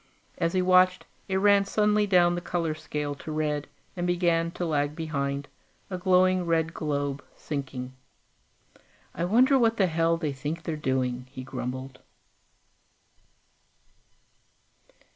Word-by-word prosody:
As 165 0 0
he 185 -1 +2
watched, 185 0 +4 0.2
it 190 - -1
ran 200 +1 +5
suddenly 210 +1 +2
down 175 -2 +4
the 175 - -3
color 170 -3 -1
scale 150 -1 -4
to 145 +2 -8
red 150 -1 -1 0.3
and 175 -1 -2
began 170 -2 +1
to 175 - -1
lag 145 -2 0
behind, 140 -3 -3 0.4
a 185 - -2
glowing 185 0 +3
red 165 0 +1
globe, 145 -3 -2
sinking. 130 -3 -5 1.2
"I 170 - -2
wonder 255 +8 +4
what 230 -1 +2
the 195 - +4
hell 165 -1 +1
they 155 -4 -2
think 150 +5 -5
they're 165 - -3
doing?" 130 -3 -1
he 130 -1 -8
grumbled. 130 0 -6
165 Hz, 130 wpm, -27 LUFS, 145-185 Hz, 1.2 s, ran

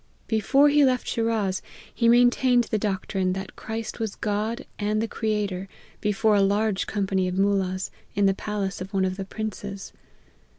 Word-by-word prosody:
Before 240 +6 +4
he 290 0 +5
left 255 -2 +2
Shiraz, 225 -5 0 0.3
he 230 -1 +3
maintained 245 +1 +5
the 215 -2 -1
doctrine 190 -2 -1
that 190 +1 -6
Christ 225 +1 -5
was 220 -3 -3
God 210 +3 -2
and 210 +1 0
the 225 - 0
Creator, 205 -4 -2 0.3
before 210 +1 +2
a 205 - +4
large 200 0 +1
company 195 -2 0
of 180 - -2
Moollahs, 190 -1 +1 0.2
in 205 0 +3
the 195 - +4
palace 200 -1 -3
of 190 +2 -6
one 190 -1 +3
of 185 0 -1
the 195 0 -5
princes. 200 -1 -6
205 Hz, 165 wpm, -25 LUFS, 195-225 Hz, 0.3 s, he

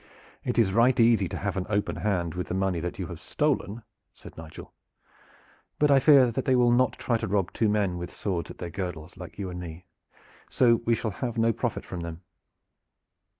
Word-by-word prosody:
"It 125 - -2
is 105 -5 +3
right 120 +3 +4
easy 115 -5 +4
to - - -4
have 100 -1 -3
an 90 - -2
open 100 -1 -1
hand 90 -6 -1
with 90 0 -4
the 90 - -3
money 95 -2 0
that 90 +1 -4
you 95 - -3
have 80 -1 -8
stolen," 120 -7 -1 0.3
said - - -14
Nigel; 80 -1 -11 1.0
"but 150 -1 +3
I 135 - +6
fear 135 -3 +6
that 130 +3 -2
they 130 - +3
will 120 -1 +4
not 125 +1 +3
try 120 - -1
to 110 - -4
rob 95 -4 0
two 110 - +1
men 100 -4 0
with 85 - -5
swords 90 -6 -3
at - - -10
their 85 - -6
girdles 90 -3 -5
like 90 -3 -10
you 95 -2 -4
and 90 - -6
me, 85 0 -8 0.6
so 115 -3 +3
we 115 - +4
shall 110 -1 -3
have 120 +5 -4
no 115 0 +3
profit - - -3
from 90 - -6
them." 85 +1 -7
100 Hz, 210 wpm, -27 LUFS, 90-120 Hz, 1.0 s, I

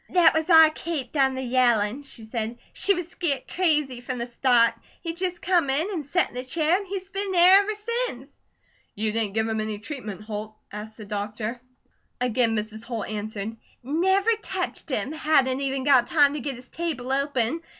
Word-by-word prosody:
"That 355 -3 +5
was 320 +2 -1
our 320 -2 +8
Kate 310 -6 -5
done 270 -3 +2
the 260 - -3
yellin'," 240 -1 +2
she 270 -5 -5
said. 220 +1 -4 0.2
"She 400 - +2
was 355 -2 -4
scart 290 -8 -2
crazy 300 -8 0
from 250 +1 -4
the 235 - -2
start. 240 -1 +3 0.3
He 335 -1 -4
jest 360 0 -3
come 345 -6 +2
in, 315 +9 +1
and 340 -6 -3
set 355 +6 +1
in - - -19
the 250 0 -4
chair 310 +5 +1
and 400 +1 -3
he's 385 0 -6
been 390 0 -2
there 365 +2 +7
ever 420 +2 -2 0.3
since." - - -10 0.5
"You 215 +1 -1
didn't 220 -2 0
give 220 +1 +1
him 220 -1 -1
any 215 -1 -3
treatment, 215 - -7
Holt?" 215 0 -6 0.2
asked 215 +1 -8
the 215 - -9
doctor. 210 +3 -4 0.6
Again 245 -2 +1
Mrs. 215 +1 -5
Holt 230 -3 -4
answered: 215 0 -4 0.3
"Never 380 - +2
touched 370 -4 -4
him! 255 0 -1
Hadn't 275 -4 +2
even 270 -1 -1
got 260 -4 +5
time 290 -1 +4
to 300 - -3
get 270 0 -4
his 250 +2 -13
table 310 -7 -4
open. 275 +1 0
265 Hz, 190 wpm, -25 LUFS, 225-330 Hz, 0.6 s, our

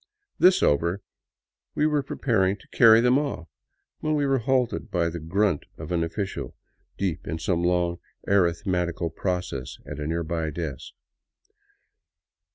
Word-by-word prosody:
This 185 +1 +5
over, 85 +7 +1 0.7
we 150 - +2
were 150 -1 +2
preparing 105 -8 0
to - - -20
carry 115 -2 +7
them 125 +3 +4
off, 140 - -4 0.5
when 155 0 0
we 145 -1 +1
were 135 -1 +2
halted 125 0 0
by 85 -1 +1
the 85 +1 -6
grunt 90 +1 0
of 80 +1 -7
an 85 -2 +1
official 95 +4 -4 0.4
deep 95 -6 -2
in 80 - -2
some 85 0 0
long 85 -1 +1 0.3
arithmetical 90 -3 +1
process 90 -10 -3
at 75 - -7
a 75 - -3
nearby 85 0 -2
desk. 75 -3 -6
90 Hz, 140 wpm, -25 LUFS, 85-110 Hz, 0.7 s, carry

